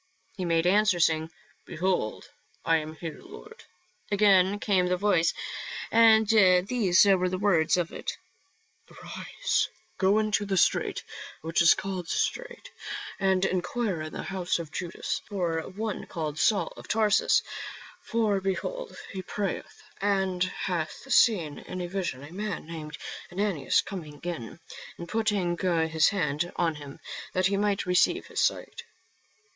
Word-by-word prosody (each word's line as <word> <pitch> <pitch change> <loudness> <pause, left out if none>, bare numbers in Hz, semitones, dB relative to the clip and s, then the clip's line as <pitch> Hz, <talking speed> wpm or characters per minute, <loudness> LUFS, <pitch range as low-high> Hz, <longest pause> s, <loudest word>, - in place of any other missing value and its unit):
He 185 - -3
made 165 -1 +2
answer, 205 0 +4
saying, 160 -1 +2 0.2
" - - -34
Behold, 175 - -1 0.4
I 165 0 +4
am 155 0 -5
here, 160 -1 -7
Lord." 430 +4 -13 0.5
Again 200 -1 +4
came 195 -4 +2
the 180 0 +1
voice 180 -4 +3 0.6
and 220 -1 +6
these 200 0 +5
were 185 -2 +3
the 185 - -2
words 185 -5 +3
of 175 -2 -1
it: - - -4 0.4
" 445 - -30
Arise, - - -2 0.3
go 195 +2 +4
into 215 -1 +1
the 195 -1 -1
street - - +2 0.4
which 165 +2 +1
is 170 - +7
called 185 -3 -4
Straight, - - -2 0.5
and 190 -1 +2
enquire 185 0 -1
in 155 0 -6
the - - -5
house 185 -2 -1
of 165 -3 -7
Judas 175 -2 -3
for 175 -5 -1
one 210 +2 -4
called 155 -2 -4
Saul 195 -6 +2
of - - -11
Tarsus; 215 -2 +3 0.6
for 220 - 0
behold, 485 - -3
he 190 - -5
prayeth, 195 +1 -4 0.2
and 190 -3 +1 0.2
hath 170 -4 -2
seen 170 -11 +3
in 185 - -7
a 180 - -2
vision 175 -8 -3
a 150 +4 -11
man 205 -3 -4
named 155 -2 -7 0.3
Ananias 180 -7 +1
coming 155 -7 -8
in, 170 -6 -5 0.4
and 170 - -7
putting 205 -4 0
his 160 -4 +2
hand 175 -4 -1
on 165 -2 +1
him, 145 -2 -10 0.3
that 185 0 +1
he 200 +2 +2
might 205 -1 0
receive 180 -1 +2
his - - -5
sight." - - -1
185 Hz, 145 wpm, -27 LUFS, 165-205 Hz, 0.6 s, is